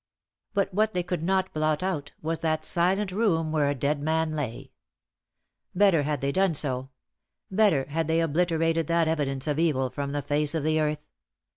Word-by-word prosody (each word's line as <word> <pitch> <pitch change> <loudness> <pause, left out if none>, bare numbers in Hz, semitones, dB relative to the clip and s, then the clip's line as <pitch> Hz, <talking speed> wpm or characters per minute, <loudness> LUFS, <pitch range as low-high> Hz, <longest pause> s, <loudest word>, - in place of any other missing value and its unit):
But 200 -1 0
what 215 +2 +1
they 180 - 0
could 175 -1 -3
not 190 +2 0
blot 155 +1 0
out 155 -6 -3
was 160 +1 -2
that 155 -1 -1
silent 190 +3 +1
room 175 -6 +1
where 150 -2 +2
a 145 - 0
dead 140 +2 -1
man 160 +1 0
lay. 140 -7 -5 1.0
Better 190 -5 +4
had 145 -1 -2
they 140 0 0
done 190 0 +2
so; 130 -2 0 0.6
better 190 -9 +3
had 155 +3 -2
they 160 +1 +2
obliterated 165 0 +1
that 170 -1 +2
evidence 140 -4 -1
of 150 0 -1
evil 135 -6 +1
from 140 -1 -4
the 145 0 -2
face 150 +1 0
of 160 - -1
the 155 +1 +2
earth. 150 0 -2
160 Hz, 180 wpm, -26 LUFS, 145-175 Hz, 1.0 s, Better